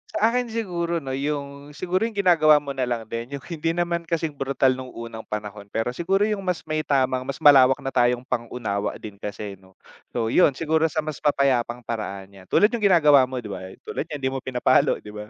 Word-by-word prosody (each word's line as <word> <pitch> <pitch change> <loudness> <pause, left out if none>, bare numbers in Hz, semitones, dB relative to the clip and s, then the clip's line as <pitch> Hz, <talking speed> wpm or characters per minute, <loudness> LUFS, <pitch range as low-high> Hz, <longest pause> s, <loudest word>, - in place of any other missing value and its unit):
Sa - - 0
akin 250 0 0
siguro 180 -7 -2
no 135 - -5
yung, 140 +1 -4
siguro 185 +4 -1
yung 225 - -10
ginagawa 165 -6 +5
mo 140 -1 -4
na 130 -2 -2
lang 120 -2 -2
din 120 +4 -4
yung 135 - -9
hindi 165 0 -1
naman 170 -1 -1
kasing 165 -2 -1
brutal 135 -1 +1
nung 130 0 -7
unang 115 -1 -8
panahon. 105 -1 -6
Pero 115 +2 0
siguro 190 +9 0
yung 210 -1 -1
mas 180 -5 -2
may 155 0 -1
tamang 130 -3 0
mas 140 - -4
malawak 135 -3 +7
na 135 - -3
tayong 125 0 +2
pang-unawa 115 -4 -3
din 105 -2 -10
kasi 100 0 -6
no. 95 0 -22 0.4
So 115 -2 0
yun 145 -4 +4
siguro 160 +2 +1
sa 155 0 -2
mas 155 -2 -5
mapayapang 125 -4 +1
paraan 100 -4 -5
yan, 95 - -18
tulad 210 - +4
yung 235 - -2
ginagawa 150 -8 +6
mo 130 - -4
di 105 - -7
ba, - - -5 0.3
tulad 160 - -4
niyan 150 - -4
hindi 130 -1 -2
mo 135 - -2
pinapalo 125 -1 +2
di 105 - -9
ba? 105 0 -8
135 Hz, 215 wpm, -24 LUFS, 120-160 Hz, 0.4 s, malawak